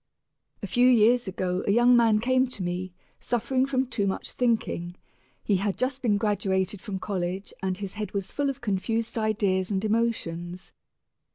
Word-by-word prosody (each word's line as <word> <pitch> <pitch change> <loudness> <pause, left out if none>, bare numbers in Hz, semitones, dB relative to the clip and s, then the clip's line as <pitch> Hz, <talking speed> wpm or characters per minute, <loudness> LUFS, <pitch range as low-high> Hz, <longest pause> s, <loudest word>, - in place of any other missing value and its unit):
A - - 0
few 245 0 +3
years 240 -1 +4
ago 185 -1 -2
a - - +4
young 240 +3 +5
man 230 -3 +5
came 255 +3 +2
to 225 -6 -6
me, 180 +1 -3 0.3
suffering 255 +3 0
from 265 -1 +1
too 225 -5 -1
much 190 - -3
thinking. 220 -8 -1 0.5
He 200 - +2
had 200 +1 -1
just 260 +1 -1
been 215 -5 +2
graduated 195 -2 0
from 205 -4 -4
college 190 0 -3
and 190 -1 -1
his 200 -1 -5
head 210 -2 -5
was 195 -2 -3
full 285 -1 0
of 270 - -5
confused 225 +1 -1
ideas 205 -4 +1
and 200 0 -1
emotions. 185 -6 -2
210 Hz, 170 wpm, -26 LUFS, 190-240 Hz, 0.5 s, young